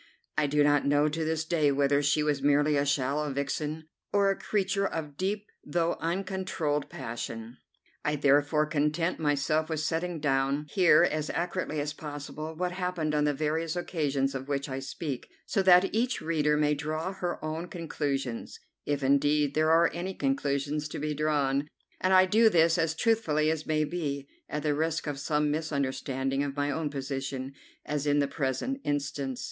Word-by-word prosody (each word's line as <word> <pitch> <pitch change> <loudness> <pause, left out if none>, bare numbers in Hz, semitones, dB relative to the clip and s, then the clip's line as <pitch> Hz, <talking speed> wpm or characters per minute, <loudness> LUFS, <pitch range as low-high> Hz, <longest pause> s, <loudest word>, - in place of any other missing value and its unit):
I 150 - +2
do 145 +1 +3
not 145 -1 +4
know 145 +1 +3
to 160 +2 -2
this 160 0 -1
day 155 -4 +2
whether 140 +1 +2
she 145 +1 +2
was 145 -2 0
merely 145 +1 +3
a 140 0 +1
shallow 140 +2 0
vixen 150 +3 -3 0.2
or 200 -1 +3
a - - 0
creature 195 -1 0
of 150 -5 -5
deep 200 +5 -2 0.2
though 170 +2 0
uncontrolled 170 -5 -2
passion. 115 +1 -6 0.5
I 150 - +1
therefore 145 +2 +3
content 155 +3 0
myself 155 +1 +1
with 160 -2 -1
setting 165 +2 -1
down 140 0 +1
here, 175 -5 +6
as 155 0 0
accurately 175 -2 -2
as 145 0 -2
possible, 150 +1 -7
what 180 +2 -1
happened 180 -4 -2
on 150 0 +2
the 150 - +2
various 155 +3 -1
occasions 145 -6 -1
of 135 0 -5
which 140 0 -1
I 135 -1 -4
speak, 135 0 -5 0.2
so 195 - +1
that 185 0 +5
each 240 +4 +1
reader 150 -2 +1
may 150 0 +3
draw 155 +5 -3
her 180 -2 -3
own 160 +3 -3
conclusions, 140 -8 -3 0.3
if 145 -1 -1
indeed 145 +1 +3
there 155 +1 +2
are 165 +1 +5
any 180 +2 -4
conclusions 140 +2 -1
to - - -6
be 150 +1 -2
drawn, 145 -2 +1 0.3
and 185 - +1
I 185 0 +7
do 220 +4 +5
this 165 -2 +4
as 160 -1 +1
truthfully 160 -8 +2
as 160 -1 -4
may 155 -1 +2
be, 145 -3 -3 0.2
at 150 -1 -3
the 150 -1 +2
risk 160 +2 -1
of 145 -2 -3
some 150 +1 +1
misunderstanding 135 -3 -1
of 140 -1 -2
my 145 0 0
own 155 0 -2
position, 135 -1 -4 0.3
as 150 0 -2
in 145 0 +3
the 140 -1 +2
present 140 - -2
instance. 140 -2 -2
150 Hz, 175 wpm, -29 LUFS, 140-165 Hz, 0.5 s, I